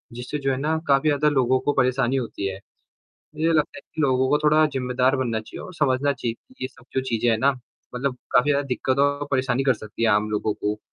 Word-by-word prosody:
जिससे 125 Hz, +4 st, -4 dB
जो 135 Hz, -1 st, 0 dB
है 130 Hz, -, -1 dB
ना 155 Hz, +3 st, 0 dB
काफ़ी 140 Hz, +2 st, +3 dB
ज़्यादा 150 Hz, +1 st, +3 dB
लोगों 130 Hz, -2 st, +2 dB
को 145 Hz, -, 0 dB
परेशानी 130 Hz, 0 st, +1 dB
होती 115 Hz, -6 st, -3 dB
है। 95 Hz, 0 st, -4 dB, 0.8 s
मुझे 160 Hz, +2 st, +1 dB
लगता 155 Hz, +3 st, +1 dB
है -, -, -10 dB
कि 155 Hz, -, -3 dB
लोगों 130 Hz, -1 st, +2 dB
को 150 Hz, -, +3 dB
थोड़ा 155 Hz, +1 st, +5 dB
ज़िम्मेदार 130 Hz, -1 st, 0 dB
बनना 115 Hz, -4 st, -1 dB
चाहिए 110 Hz, -, -10 dB
और 185 Hz, -, -10 dB
समझना 140 Hz, -1 st, +1 dB
चाहिए 120 Hz, -3 st, -3 dB
कि 260 Hz, -, -25 dB
ये 130 Hz, -, -2 dB
सब -, -, -20 dB
जो 130 Hz, -, +2 dB
चीज़ें 115 Hz, +1 st, +1 dB
हैं 110 Hz, -, +1 dB
ना 140 Hz, +3 st, +4 dB, 0.4 s
मतलब 125 Hz, 0 st, -2 dB, 0.2 s
काफ़ी 125 Hz, +4 st, +4 dB
ज़्यादा 140 Hz, 0 st, +1 dB
दिक्कत 130 Hz, +1 st, -1 dB
और 145 Hz, 0 st, -2 dB
परेशानी 130 Hz, -1 st, +1 dB
कर -, -, +4 dB
सकती 110 Hz, +1 st, -8 dB
है 115 Hz, -, +4 dB
आम 105 Hz, +1 st, +2 dB
लोगों 105 Hz, 0 st, -1 dB
को। 105 Hz, 0 st, -3 dB
130 Hz, 235 wpm, -23 LUFS, 120-145 Hz, 0.8 s, थोड़ा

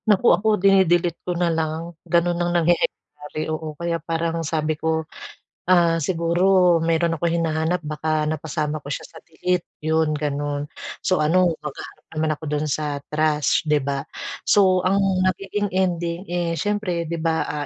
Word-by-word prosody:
Naku 210 Hz, +3 st, +5 dB
ako 195 Hz, +5 st, 0 dB
dini-delete 180 Hz, -3 st, +3 dB
ko 180 Hz, -1 st, -3 dB
na 170 Hz, -1 st, +1 dB
lang, 160 Hz, +1 st, -3 dB, 0.2 s
ganon 170 Hz, 0 st, +2 dB
ang 175 Hz, -, +1 dB
nangyayari 170 Hz, +1 st, +3 dB, 0.6 s
oo 155 Hz, -1 st, -5 dB
kaya 170 Hz, -1 st, -2 dB
parang 165 Hz, +1 st, -2 dB
sabi 155 Hz, 0 st, -1 dB
ko, 160 Hz, +1 st, -1 dB, 0.6 s
ah, 170 Hz, -2 st, +4 dB
siguro 175 Hz, +2 st, +3 dB
meron 165 Hz, 0 st, +1 dB
akong 170 Hz, +1 st, 0 dB
hinahanap 160 Hz, +1 st, 0 dB
baka 155 Hz, 0 st, -1 dB
napasama 155 Hz, 0 st, -2 dB
ko 140 Hz, -, -9 dB
siya 145 Hz, -, -4 dB
sa 160 Hz, -, -13 dB
delete 180 Hz, +2 st, -2 dB, 0.2 s
'yun 160 Hz, -1 st, +2 dB
ganun, 145 Hz, 0 st, -2 dB, 0.4 s
so 185 Hz, -4 st, +2 dB
ano 175 Hz, +3 st, +3 dB
maghahanap 150 Hz, -2 st, -8 dB
naman 155 Hz, 0 st, +1 dB
ako 150 Hz, +1 st, -12 dB
dun 150 Hz, 0 st, -1 dB
sa 150 Hz, -1 st, -2 dB
trash 150 Hz, -1 st, +1 dB
'di 150 Hz, -, +4 dB
ba. 140 Hz, -1 st, -1 dB, 0.5 s
So 185 Hz, -2 st, +5 dB
ang 190 Hz, +2 st, +2 dB, 0.3 s
nagiging 195 Hz, +2 st, -2 dB
ending, 175 Hz, -1 st, -1 dB
eh, 175 Hz, -2 st, -2 dB
siyempre 185 Hz, -2 st, -1 dB
di 165 Hz, 0 st, -4 dB
ba, 160 Hz, 0 st, +1 dB
ah, 145 Hz, -1 st, -3 dB
165 Hz, 155 wpm, -22 LUFS, 155-175 Hz, 0.6 s, Naku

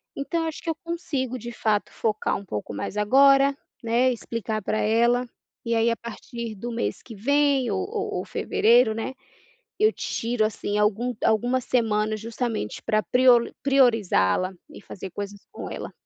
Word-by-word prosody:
Então 325 Hz, +4 st, -2 dB
acho 315 Hz, -, -6 dB
que 335 Hz, -, -5 dB
eu 325 Hz, -, 0 dB
consigo 290 Hz, -7 st, -3 dB
de 240 Hz, 0 st, -7 dB
fato 215 Hz, -3 st, 0 dB
focar 215 Hz, -2 st, -1 dB
pouco 105 Hz, -, -5 dB
mais 195 Hz, -, -5 dB
agora, 275 Hz, +5 st, +5 dB, 0.3 s
né, 240 Hz, +3 st, +3 dB
explicar 220 Hz, -2 st, -4 dB
para 215 Hz, -, -1 dB
ela, 235 Hz, +3 st, +2 dB, 0.4 s
e 230 Hz, -, 0 dB
aí 225 Hz, +1 st, +3 dB
a 230 Hz, -, 0 dB
partir 235 Hz, -1 st, -7 dB
do 235 Hz, +5 st, -6 dB
mês 230 Hz, -, -2 dB
que 230 Hz, -, -11 dB
vem 275 Hz, +1 st, +2 dB
ou 190 Hz, -, 0 dB
ou 435 Hz, -2 st, -3 dB
ou -, -, -5 dB
fevereiro, 230 Hz, 0 st, +3 dB
né, 225 Hz, +4 st, -4 dB, 0.7 s
eu 430 Hz, +2 st, +4 dB
tiro 230 Hz, -1 st, -1 dB
assim 210 Hz, -1 st, -2 dB
algum 220 Hz, +4 st, +1 dB
algumas 245 Hz, +3 st, +2 dB
semanas 215 Hz, -3 st, 0 dB
justamente 230 Hz, -, -3 dB
para 215 Hz, 0 st, +1 dB
prioli 250 Hz, -1 st, +4 dB
priorizá-la, 220 Hz, -, +3 dB, 0.2 s
e -, -, -11 dB
fazer 190 Hz, -1 st, -8 dB
coisas 205 Hz, +1 st, -6 dB
com -, -, -7 dB
ela. -, -, -6 dB
235 Hz, 160 wpm, -25 LUFS, 215-255 Hz, 0.7 s, agora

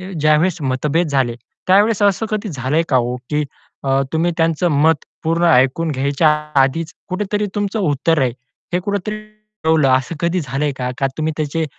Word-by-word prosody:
अ, 185 Hz, +1 st, -8 dB
ज्यावेळेस 155 Hz, +4 st, +3 dB
मतभेद 145 Hz, +5 st, 0 dB
झाले, 130 Hz, -4 st, +1 dB, 0.3 s
त्यावेळेस 205 Hz, +2 st, +4 dB
असं 205 Hz, +2 st, +2 dB
कधी 215 Hz, 0 st, -2 dB
झालंय 145 Hz, +1 st, 0 dB
का 130 Hz, -, +3 dB
हो, 125 Hz, 0 st, 0 dB
की 150 Hz, 0 st, +1 dB, 0.4 s
अ, 135 Hz, 0 st, +2 dB
तुम्ही 165 Hz, +2 st, +1 dB
त्यांचं 165 Hz, +1 st, +1 dB
मत 160 Hz, -2 st, +3 dB, 0.2 s
पूर्ण 165 Hz, +2 st, +1 dB
ऐकून 135 Hz, +6 st, +3 dB
घ्यायच्या 140 Hz, +3 st, +1 dB, 0.3 s
आधीच 155 Hz, +5 st, 0 dB, 0.2 s
कुठेतरी 205 Hz, +2 st, -1 dB
तुमचं 205 Hz, +1 st, -1 dB
उत्तर 155 Hz, -2 st, +1 dB
आहे. 125 Hz, -2 st, +1 dB, 0.4 s
हे 180 Hz, -, +2 dB
कुठेतरी 205 Hz, +2 st, -3 dB, 0.5 s
ठेवलं, 160 Hz, -3 st, +4 dB
असं 130 Hz, +5 st, +1 dB
कधी 170 Hz, +1 st, 0 dB
झालंय 140 Hz, +1 st, -2 dB
का? 125 Hz, -1 st, -2 dB
का 135 Hz, -, +2 dB
तुम्ही 155 Hz, 0 st, 0 dB
त्याचे 155 Hz, +1 st, -1 dB
160 Hz, 170 wpm, -18 LUFS, 135-180 Hz, 0.5 s, त्यावेळेस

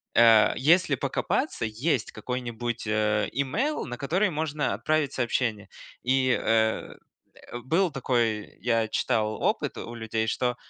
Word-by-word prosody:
э, 115 Hz, -1 st, +6 dB
если 170 Hz, +7 st, +4 dB
покопаться, 280 Hz, -, -1 dB
есть 120 Hz, +3 st, -1 dB
какой-нибудь 120 Hz, 0 st, -4 dB
имейл, 110 Hz, -, 0 dB
на 125 Hz, -1 st, -6 dB
который 180 Hz, +9 st, +1 dB
можно 150 Hz, -1 st, -1 dB
отправить 155 Hz, -3 st, 0 dB
сообщение. 115 Hz, -4 st, -1 dB, 0.3 s
И, 130 Hz, 0 st, +2 dB
э, 110 Hz, 0 st, +1 dB, 0.7 s
был 170 Hz, +6 st, +1 dB
такой, 120 Hz, -5 st, -1 dB
я 115 Hz, -1 st, +1 dB
читал, 110 Hz, -2 st, -1 dB
опыт -, -, 0 dB
у 120 Hz, -, -7 dB
людей, 110 Hz, -1 st, -2 dB
что 125 Hz, +2 st, 0 dB
120 Hz, 120 wpm, -26 LUFS, 110-140 Hz, 0.7 s, э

